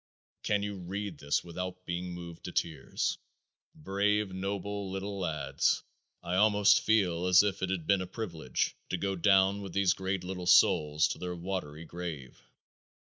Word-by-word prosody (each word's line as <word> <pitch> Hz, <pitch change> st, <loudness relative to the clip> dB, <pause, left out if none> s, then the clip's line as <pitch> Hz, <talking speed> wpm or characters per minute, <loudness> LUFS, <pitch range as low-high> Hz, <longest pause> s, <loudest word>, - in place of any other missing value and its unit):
Can 105 Hz, -1 st, 0 dB
you 100 Hz, -1 st, -4 dB
read 95 Hz, -2 st, -5 dB
this 70 Hz, 0 st, 0 dB
without 90 Hz, +1 st, -6 dB
being 90 Hz, +1 st, -3 dB
moved 85 Hz, -1 st, -9 dB
to -, -, -5 dB
tears? 75 Hz, -6 st, -2 dB, 0.6 s
Brave, 100 Hz, +3 st, 0 dB
noble 100 Hz, +1 st, -3 dB
little 100 Hz, +1 st, -4 dB
lads! 80 Hz, -5 st, 0 dB, 0.4 s
I 90 Hz, +2 st, -1 dB
almost 105 Hz, 0 st, +5 dB
feel 90 Hz, -5 st, +2 dB
as 90 Hz, +2 st, +7 dB
if 100 Hz, -2 st, -1 dB
it 95 Hz, -, -1 dB
had 90 Hz, -4 st, -2 dB
been 100 Hz, 0 st, +3 dB
a 90 Hz, -, -4 dB
privilege 85 Hz, -, -3 dB
to -, -, -1 dB
go 95 Hz, -1 st, -1 dB
down 95 Hz, +2 st, +4 dB
with 95 Hz, -3 st, -7 dB
these 100 Hz, -2 st, +3 dB
great 95 Hz, -1 st, -3 dB
little 90 Hz, -1 st, -5 dB
souls 75 Hz, -3 st, +5 dB
to -, -, -4 dB
their 90 Hz, 0 st, -4 dB
watery 85 Hz, -3 st, -5 dB
grave. 80 Hz, -6 st, -7 dB
95 Hz, 160 wpm, -30 LUFS, 85-100 Hz, 0.6 s, as